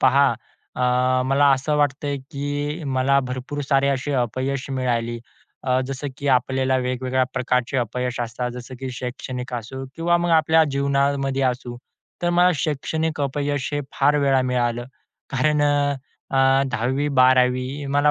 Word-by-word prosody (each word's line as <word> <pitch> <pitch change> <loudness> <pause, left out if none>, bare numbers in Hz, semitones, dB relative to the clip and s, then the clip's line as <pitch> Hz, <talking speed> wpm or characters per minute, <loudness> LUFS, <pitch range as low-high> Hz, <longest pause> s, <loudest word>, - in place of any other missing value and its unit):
पहा, 135 +2 +5 0.5
अ, 125 0 +2
मला 140 +2 +4
असं 145 +3 -1
वाटतं 145 0 0
आहे, 140 - -1
की 145 +3 -4
मला 135 +1 +2
भरपूर 130 +3 -4
सारे 140 -1 +3
असे 140 +1 -1
अपयश 130 +4 -3
मिळाली. 120 -3 -1 0.5
अ, 130 0 +2
जसं 135 +2 -4
की 140 - -2
आपल्याला 130 +1 +2
वेगवेगळ्या 130 +1 0
प्रकारचे 125 0 0
अपयश 125 +1 -2
असतात. 120 +1 -3
जसं 125 +1 -8
की 130 -1 -4
शैक्षणिक 125 0 -6
असो, 125 +3 -5
किंवा 170 +1 +2
मग 175 0 0
आपल्या 160 +1 +4
जीवनामध्ये 140 -1 +1
असू. 125 -1 -1 0.5
तर 175 - +2
मला 175 +1 +4
शैक्षणिक 155 +1 -2
अपयश 140 0 -1
हे 145 - 0
फार 145 +2 +3
वेळा 135 -2 +3
मिळालं, 120 -1 0 0.5
कारण 145 +3 +2
अ 145 -1 +2 0.4
अ, 135 - -1 0.3
10वी 130 +5 0
12वी 130 +2 +3
मला 145 +2 +3
135 Hz, 145 wpm, -22 LUFS, 125-145 Hz, 0.5 s, पहा